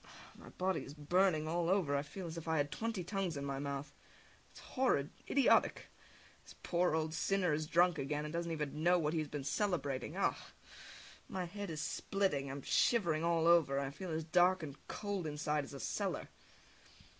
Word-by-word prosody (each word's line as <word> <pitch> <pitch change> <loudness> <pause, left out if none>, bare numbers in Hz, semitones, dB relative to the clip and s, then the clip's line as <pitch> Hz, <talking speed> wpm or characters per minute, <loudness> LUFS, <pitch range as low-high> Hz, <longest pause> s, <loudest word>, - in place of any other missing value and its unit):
My - - -13
body 185 +1 -1
is 140 - -10
burning 155 +1 +2
all 170 +1 0
over, 185 -7 +2
and 140 - +2
I - - -1
feel 175 +6 -7
as 165 -1 -6
if 165 -1 -7
I 160 0 +1
had 145 0 0
twenty 225 -5 -2
tongues 185 -3 -2
in 140 - -4
my 135 -1 -3
mouth. 140 0 -4 0.6
It - - -17
is - - -12
horrid! 250 - +1 0.2
Idiotic! 275 -2 +3 0.5
This - - -14
poor 175 -2 +2
old 155 0 -1
sinner 185 -2 +1
is 155 +1 -1
drunk 175 -1 +3
again, 150 +2 -2
and 150 - -6
doesn't 170 0 -2
even 150 -1 -3
know 175 +2 +5
what 155 -2 0
he 165 - +1
has 155 - -2
been 145 -1 -5
celebrating! 145 - -1
Ugh! - - +2 1.0
My 185 -1 -3
head 200 +2 -6
is 155 -2 -4
splitting, 190 -10 -1
I - - -4
am 140 -1 -7
shivering 170 -9 +2
all 170 -1 +2
over, 165 -5 +5
and 140 - 0
I 135 - -4
feel 175 +6 -7
as 160 0 -2
dark 180 +2 +3
and 140 -3 -6
cold 200 -5 -3
inside 150 0 -1
as 135 - -11
a - - -7
cellar! - - -2
160 Hz, 205 wpm, -35 LUFS, 145-180 Hz, 1.0 s, know